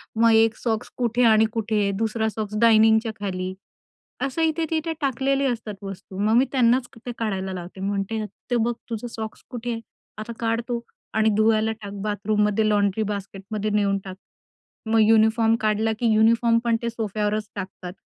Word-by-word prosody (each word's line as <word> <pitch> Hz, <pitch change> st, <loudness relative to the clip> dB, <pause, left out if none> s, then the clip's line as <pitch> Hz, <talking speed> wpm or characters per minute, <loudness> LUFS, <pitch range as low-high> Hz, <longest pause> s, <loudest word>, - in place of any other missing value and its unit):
मग 230 Hz, +1 st, +5 dB
एक 225 Hz, 0 st, +4 dB
सॉक्स 220 Hz, -3 st, -2 dB
कुठे 245 Hz, 0 st, +1 dB
आणि 220 Hz, 0 st, +5 dB
कुठे. 215 Hz, -3 st, 0 dB
दुसरा 220 Hz, 0 st, 0 dB
सॉक्स 215 Hz, 0 st, -5 dB
डायनिंगच्या 220 Hz, 0 st, +5 dB
खाली. 185 Hz, -2 st, -3 dB, 0.7 s
असं 275 Hz, +4 st, -1 dB
इथे-तिथे 320 Hz, 0 st, 0 dB
टाकलेले 275 Hz, +1 st, +1 dB
असतात 225 Hz, -4 st, -3 dB
वस्तू. 195 Hz, -1 st, -8 dB
मग 210 Hz, +2 st, +2 dB
मी 255 Hz, -, +5 dB
त्यांनाच 245 Hz, -1 st, +3 dB, 0.2 s
ते 245 Hz, -, -3 dB
काढायला 190 Hz, -4 st, -2 dB
लावते. 180 Hz, +1 st, -8 dB
म्हणते, 200 Hz, +2 st, -2 dB, 0.3 s
"ते -, -, +3 dB
बघ 240 Hz, +1 st, 0 dB, 0.2 s
तुझं 230 Hz, +1 st, -4 dB
सॉक्स 220 Hz, -1 st, -7 dB
कुठे 245 Hz, 0 st, -4 dB
आहे. 230 Hz, -1 st, -4 dB, 0.4 s
आता 215 Hz, +2 st, -6 dB
काढ 230 Hz, 0 st, 0 dB
तो 235 Hz, -1 st, -1 dB, 0.3 s
आणि 220 Hz, 0 st, +3 dB
धुवायला 220 Hz, 0 st, +3 dB
टाक 200 Hz, -1 st, -7 dB
बाथरूममध्ये 210 Hz, 0 st, +1 dB
लॉन्ड्री 205 Hz, 0 st, +2 dB
बास्केटमध्ये 200 Hz, +2 st, -5 dB
नेऊन 200 Hz, -1 st, +2 dB
टाक." 185 Hz, -1 st, -7 dB, 0.7 s
मग 225 Hz, 0 st, +4 dB
युनिफॉर्म 225 Hz, 0 st, +4 dB
काढला 215 Hz, +1 st, +1 dB
की 240 Hz, -, +1 dB
युनिफॉर्म 230 Hz, +2 st, +4 dB
पण 230 Hz, -, +3 dB
ते 235 Hz, -, 0 dB
सोफ्यावरच 215 Hz, -1 st, -2 dB
टाकतात. 190 Hz, -2 st, -7 dB
220 Hz, 160 wpm, -24 LUFS, 210-230 Hz, 0.7 s, मग